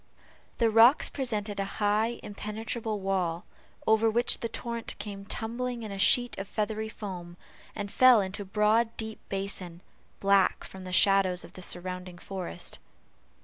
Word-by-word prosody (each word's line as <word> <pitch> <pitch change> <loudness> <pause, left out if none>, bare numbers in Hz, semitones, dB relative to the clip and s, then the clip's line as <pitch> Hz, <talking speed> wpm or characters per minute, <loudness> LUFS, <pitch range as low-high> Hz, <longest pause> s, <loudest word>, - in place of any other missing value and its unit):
The 230 -2 +3
rocks 230 +6 +6
presented 215 -6 -3
a - - +1
high 215 +3 +1
impenetrable 215 +1 -4
wall, 185 -3 -1 0.4
over 220 +1 +4
which 235 +2 +2
the 230 - -3
torrent 235 0 -5
came 200 -2 -7
tumbling 235 +2 -4
in 215 - -6
a 195 - -6
sheet 245 +4 +4
of 195 - -5
feathery 220 +1 -2
foam, 180 -5 -7 0.4
and 205 -2 -4
fell 255 -1 +7
into 195 +1 -3
a - - -6
broad 215 +3 +2
deep 220 -1 -5
basin, 195 -3 -2 0.4
black 195 -1 +3
from 190 -1 -10
the 185 - -6
shadows 190 -1 +4
of 170 +2 -13
the 185 - -10
surrounding 180 0 -4
forest. 180 - -4
205 Hz, 150 wpm, -29 LUFS, 190-225 Hz, 0.4 s, fell